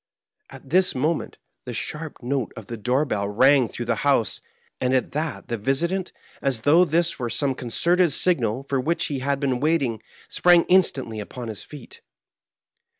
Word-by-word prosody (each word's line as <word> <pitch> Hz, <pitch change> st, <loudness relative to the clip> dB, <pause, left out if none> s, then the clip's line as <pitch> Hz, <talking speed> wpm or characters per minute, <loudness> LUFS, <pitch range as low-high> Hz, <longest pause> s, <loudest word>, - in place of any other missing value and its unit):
At 135 Hz, -, -13 dB
this 185 Hz, +2 st, +3 dB
moment, 155 Hz, +5 st, -1 dB, 0.3 s
the -, -, -6 dB
sharp 155 Hz, -3 st, -6 dB
note 130 Hz, -1 st, -2 dB
of -, -, -8 dB
the 120 Hz, -, -6 dB
door 125 Hz, +6 st, 0 dB
bell 100 Hz, -6 st, -2 dB
rang 130 Hz, +4 st, +4 dB
through 120 Hz, -, -6 dB
the 115 Hz, -1 st, 0 dB
house; 140 Hz, -6 st, +2 dB, 0.4 s
and 130 Hz, +1 st, +1 dB
that 150 Hz, +3 st, -2 dB
visitant, 135 Hz, -, -1 dB, 0.3 s
as 130 Hz, -5 st, 0 dB
though 160 Hz, +8 st, +5 dB
this 170 Hz, 0 st, 0 dB
were 120 Hz, -2 st, -2 dB
some 140 Hz, +2 st, 0 dB
concerted 170 Hz, +8 st, +1 dB
signal 135 Hz, -7 st, +2 dB
for 135 Hz, -2 st, 0 dB
which 165 Hz, +6 st, 0 dB
he 135 Hz, -, -2 dB
had 140 Hz, +1 st, -1 dB
been 135 Hz, -3 st, -1 dB
waiting, 140 Hz, -7 st, 0 dB, 0.3 s
sprang 175 Hz, -1 st, +4 dB
instantly 135 Hz, -, +2 dB
upon 115 Hz, +3 st, -7 dB
his 110 Hz, -, -5 dB
feet. 145 Hz, -5 st, -12 dB
135 Hz, 160 wpm, -23 LUFS, 120-160 Hz, 0.4 s, though